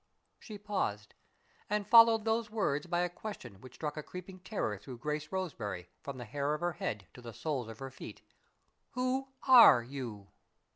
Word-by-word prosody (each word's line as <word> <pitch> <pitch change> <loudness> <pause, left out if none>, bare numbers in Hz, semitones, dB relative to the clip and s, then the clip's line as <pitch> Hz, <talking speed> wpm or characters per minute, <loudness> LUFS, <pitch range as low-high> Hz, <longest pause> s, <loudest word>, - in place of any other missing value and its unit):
'" - - -47
She 215 -3 -9
paused, 145 - -3 0.6
and 210 0 0
followed 230 -1 +7
those 225 0 0
words 175 -8 -1
by 175 0 +1
a 180 - +1
question 170 - -9
which 130 -1 -13
struck 150 -1 -4
a - - -2
creeping 180 +4 -9
terror 180 - -3
through 120 +4 -9
Grace 150 +4 -4
Roseberry, 115 - -4
from 140 -2 -7
the 120 - -7
hair 145 +5 -1
of 150 - -8
her 175 0 0
head 105 -8 -4
to 125 - -12
the 120 -1 -9
soles 135 -1 -3
of 115 -1 -9
her 135 +1 -7
feet: - - -10 0.7
"_Who 255 +1 0 0.2
are 235 - +9
you? 120 -6 -7
150 Hz, 185 wpm, -32 LUFS, -, 0.7 s, are